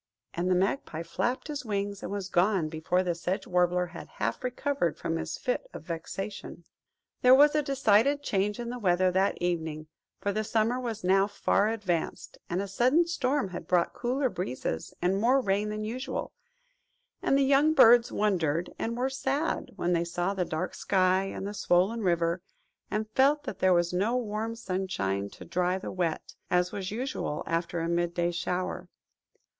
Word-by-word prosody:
And 175 +2 -1
the 185 - +4
Magpie 180 - -1
flapped 190 - -2
his 295 -3 -4
wings, 200 -3 -3
and - - -5
was 200 -2 -3
gone 185 -3 +2
before 160 +3 0
the 175 -1 0
Sedge 180 +3 -3
Warbler 180 0 +2
had - - -8
half - - -2
recovered 250 - -1
from 165 - -2
his - - -4
fit - - -2
of - - -7
vexation. 175 +3 -6 0.6
There 255 +1 +8
was 290 +2 +6
a 305 - +3
decided 275 0 +3
change 205 -1 0
in 235 0 -4
the 250 - -5
weather 185 -2 +3
that 190 +2 +1
evening, 160 -3 -2 0.3
for 200 - -1
the 215 +1 -1
summer 225 +3 +1
was 230 -5 -4
now 195 +2 +4
far 205 0 +1
advanced, 200 -7 -3
and 180 +3 -1
a - - -5
sudden 255 - +3
storm 285 - 0
had 180 - -7
brought 175 -2 +2
cooler 260 +3 0
breezes 130 - -4
and 190 +3 +2
more 255 +4 +4
rain 205 -3 0
than 215 0 -3
usual, 250 +5 -4 0.9
and 275 - +3
the 275 - +4
young 280 +3 +4
birds 240 -3 +7
wondered, 175 -6 0
and 230 +1 -2
were 255 +2 +1
sad, 270 +3 -1
when 175 +1 0
they 170 0 +2
saw 175 +3 -1
the 185 -2 -1
dark 160 +3 -3
sky, 185 0 +2
and 195 0 -5
the 205 - -4
swollen 200 +3 +2
river, 170 -2 +1 0.5
and 215 +1 -2
felt 285 +5 +3
that 195 - -6
there 185 - +4
was 175 0 +2
no 210 +7 +1
warm 225 -1 -3
sunshine 185 - -2
to - - -12
dry 180 +1 0
the 190 - -6
wet, 175 -4 -2 0.2
as 180 0 +2
was 190 -2 -4
usual 230 - -3
after 170 +1 -1
a 165 - -1
mid 170 0 0
day 175 0 +1
shower. 180 +1 -3
195 Hz, 180 wpm, -28 LUFS, 175-235 Hz, 0.9 s, There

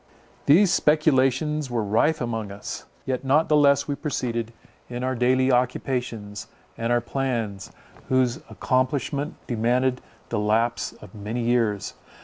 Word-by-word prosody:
These 175 +6 +6
speculations 150 -1 +2
were 120 -2 -1
rife 115 +10 +2
among 115 -4 -3
us; 100 +1 -7 0.2
yet 130 -1 -2
not 145 +4 +3
the 155 - +5
less 140 -1 +4
we 145 - -1
proceeded 120 -6 -3 0.4
in 120 +1 -4
our 130 0 0
daily 130 +2 +2
occupations, 125 -4 -1 0.3
and 115 +1 -2
our 120 0 +3
plans, 115 -6 -3 0.4
whose 130 -2 +2
accomplishment 130 +5 -1
demanded 125 +2 +1 0.3
the 115 - -1
lapse 115 +3 0
of - - -14
many 110 +3 -4
years. 115 -4 0
125 Hz, 130 wpm, -24 LUFS, 115-135 Hz, 0.4 s, These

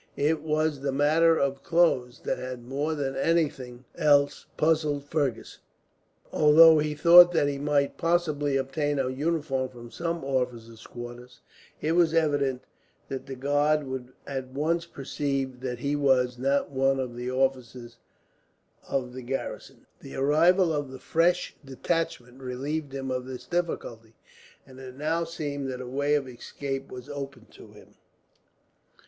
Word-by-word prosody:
It 150 +2 +1
was 155 -1 0
the 140 0 -2
matter 160 +4 +3
of 140 0 -1
clothes 140 -8 +1
that - - -2
had, 130 -1 -6
more 145 +5 -2
than 135 -2 -3
anything 135 -5 -1
else, 145 -1 +2
puzzled 155 -3 +1
Fergus; 145 -6 -2 0.6
for - - -9
although 160 +1 +8
he 150 0 -1
thought 175 +3 +8
that 155 -4 +2
he 140 -1 -2
might 145 -1 0
possibly 155 -5 +1
obtain 145 +2 -1
a 130 -1 0
uniform 140 -2 -1
from 120 -2 -12
some 170 -1 -3
officer's 125 -4 -3
quarters, 120 +1 -10 0.4
it 155 - 0
was 165 -1 +3
evident 145 -5 +1 0.5
that 135 - -5
the 135 - -6
guard 145 +3 +1
would 130 -2 -6
at 135 -2 -4
once 160 +6 -1
perceive 135 -3 -3
that 125 -1 -4
he 140 +4 -1
was 130 -3 +2
not 140 +2 0
one 135 0 +1
of 125 -2 -4
the 125 +1 -4
officers 130 -2 -2 0.9
of 125 -2 -2
the 130 - -7
garrison. 135 +2 -6
The - - -10
arrival 165 +5 +3
of 145 -2 -2
the 130 - -9
fresh 175 +6 +1
detachment 135 -2 -3
relieved 140 +4 -4
him 135 -1 -4
of 125 0 -3
this 125 -1 -8
difficulty, 120 -9 -4 0.5
and 130 -1 -14
it 130 -1 -10
now 160 +4 -1
seemed 145 -4 -4
that 125 -1 -5
a 130 - -6
way 140 +4 0
of 140 -3 -1
escape 135 +2 -6
was 125 +1 -9
open 140 -4 -7
to - - -15
him. - - -17
140 Hz, 155 wpm, -27 LUFS, 130-155 Hz, 0.9 s, although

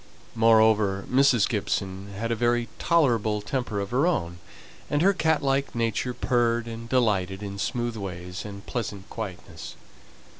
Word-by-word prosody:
Moreover, 110 -3 +4
Mrs. 130 -4 +4
Gibson 100 -2 -3
had 115 +2 -2
a - - +1
very 120 +1 +1
tolerable 115 -10 +2
temper 115 -2 -3
of 100 +1 -4
her 135 +7 +2
own, 85 - -1 0.5
and 145 +2 +1
her 195 +2 +5
cat 160 -4 +1
like 135 -1 0
nature 115 +2 -1
purred 120 -1 +1
and 115 0 -7
delighted 100 -6 +1
in 100 -1 -6
smooth 120 +2 -2
ways, 90 -3 -6
and 100 -1 -9
pleasant 105 -5 -4
quietness. 90 -6 -7
115 Hz, 145 wpm, -26 LUFS, 100-125 Hz, 0.5 s, her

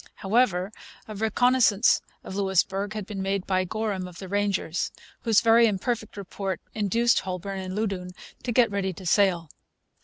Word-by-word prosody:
However, 195 -3 +1 0.4
a 215 - -7
reconnaissance 220 +1 +3 0.2
of 190 - -7
Louisbourg 195 +1 0
had 215 -2 -5
been 200 -1 -5
made 195 0 -1
by 185 -1 +1
Gorham 200 -2 -3
of 180 -1 -12
the 190 - -8
Rangers, 195 -4 -1 0.3
whose 225 -3 +3
very 230 0 +6
imperfect 215 +1 -2
report 195 -2 -4
induced 230 +3 +2
Holbourne 190 +1 -5
and 185 0 -5
Loudoun 195 -4 -2 0.3
to 245 - -3
get 235 -2 +3
ready 195 -2 -1
to 185 +2 -11
sail. 175 -4 +2
200 Hz, 155 wpm, -26 LUFS, 190-220 Hz, 0.4 s, very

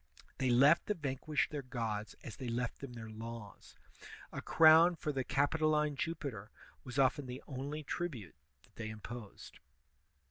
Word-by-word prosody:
They 130 - +2
left 140 +7 +5
the 210 - +1
vanquished 145 -1 -1
their 150 -2 -3
gods 115 -5 -4
as 120 - -8
they 130 - -5
left 120 0 -2
them 135 -3 -7
their 115 -2 -8
laws. 115 -1 -9 0.6
A - - -5
crown 165 +2 +7
for 155 - -2
the 135 -2 -1
Capitoline 150 +2 +2
Jupiter 135 -9 -4 0.3
was 125 0 -7
often 135 0 +3
the 125 +2 -7
only 145 +3 -5
tribute 135 - -4 0.3
that - - -26
they 110 -1 -4
imix)sed. 110 0 -9
130 Hz, 150 wpm, -35 LUFS, 115-150 Hz, 0.6 s, crown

